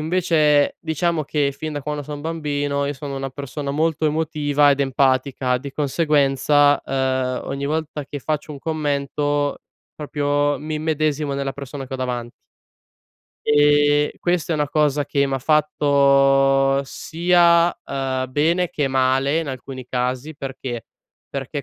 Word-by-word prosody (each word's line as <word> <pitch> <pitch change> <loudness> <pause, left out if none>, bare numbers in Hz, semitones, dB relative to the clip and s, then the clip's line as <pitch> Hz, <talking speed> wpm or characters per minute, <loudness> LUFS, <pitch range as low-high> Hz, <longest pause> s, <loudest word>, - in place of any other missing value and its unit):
invece, 155 -3 +2
diciamo 160 0 -1
che 145 -1 0
fin 155 +2 -6
da 145 - -4
quando 150 +1 -4
son 145 0 -7
bambino 145 -3 -2
io 145 - -2
sono 140 0 -6
una 135 0 -3
persona 140 +1 -6
molto 155 +1 0
emotiva 150 -2 +2
ed 140 0 +1
empatica 130 -1 +1
di 140 +2 -7
conseguenza, 145 -1 +2
uhm, 130 -1 -1
ogni 140 0 -4
volta 155 -2 -3
che 145 - -6
faccio 155 +2 -3
un 140 - -8
commento 145 -1 -1 0.4
proprio 145 -1 0
mi 155 +1 -5
immedesimo 155 -2 -1
nella 140 -1 -2
persona 140 0 -7
che 135 - -12
ho - - -2
davanti 120 -2 -3 1.1
ehm, 145 0 +4
questa 175 -1 0
è - - +1
una 150 -1 0
cosa 150 -1 +1
che 140 -1 +1
m'ha 135 0 -2
fatto 140 -2 +3
sia, 170 +3 +3
uhm, 130 -1 -2
bene 165 +5 +1
che 145 - -1
male 135 +3 +2
in 165 - -3
alcuni 130 -1 -7
casi, 125 +4 -2
perché? 130 -4 -6 0.4
Perché 140 +1 -5
145 Hz, 140 wpm, -21 LUFS, 135-150 Hz, 1.1 s, ehm